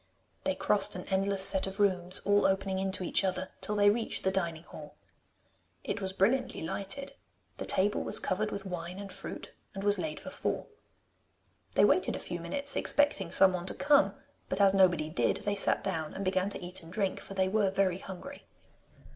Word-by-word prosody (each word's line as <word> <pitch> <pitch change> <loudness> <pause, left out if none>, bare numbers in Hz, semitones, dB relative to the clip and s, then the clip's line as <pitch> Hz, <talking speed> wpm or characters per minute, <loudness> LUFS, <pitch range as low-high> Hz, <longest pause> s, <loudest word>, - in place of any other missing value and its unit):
They - - 0
crossed - - +1
an - - -7
endless 195 0 +5
set 190 -1 +5
of 195 +2 -5
rooms, 185 -3 +1
all 205 -1 +3
opening 190 0 -1
into 190 0 -2
each 180 - +1
other, 185 0 -2
till 210 - -1
they 205 0 +5
reached 225 +1 -3
the 190 - +1
dining 170 -4 -3
hall. - - -12 0.9
It 205 - -4
was 190 -1 -2
brilliantly 235 +6 0
lighted; 200 +11 -3 0.4
the - - -6
table 205 +2 +2
was - - +3
covered 210 +3 -2
with 200 -1 -6
wine 180 -1 -6
and 200 0 -7
fruit, - - -8 0.2
and 195 - -5
was 205 0 +3
laid 315 - -4
for - - -9
four. - - -3 1.1
They - - +5
waited - - +2
a - - -5
few - - -6
minutes 285 0 +2
expecting 290 - +1
someone 185 -1 +4
to - - -1
come, 290 0 +3 0.3
but - - -2
as 195 -1 +5
nobody 175 -5 +3
did, 170 - 0
they 205 - 0
sat 200 - +2
down 160 -5 -4
and 195 - -5
began 185 +1 0
to 195 - -5
eat 185 +2 -2
and 165 0 -13
drink, 195 -1 -2
for 195 - -10
they 190 -1 +1
were 200 0 +1
very 190 -1 0
hungry. 195 +10 -10
195 Hz, 195 wpm, -30 LUFS, 185-205 Hz, 1.1 s, endless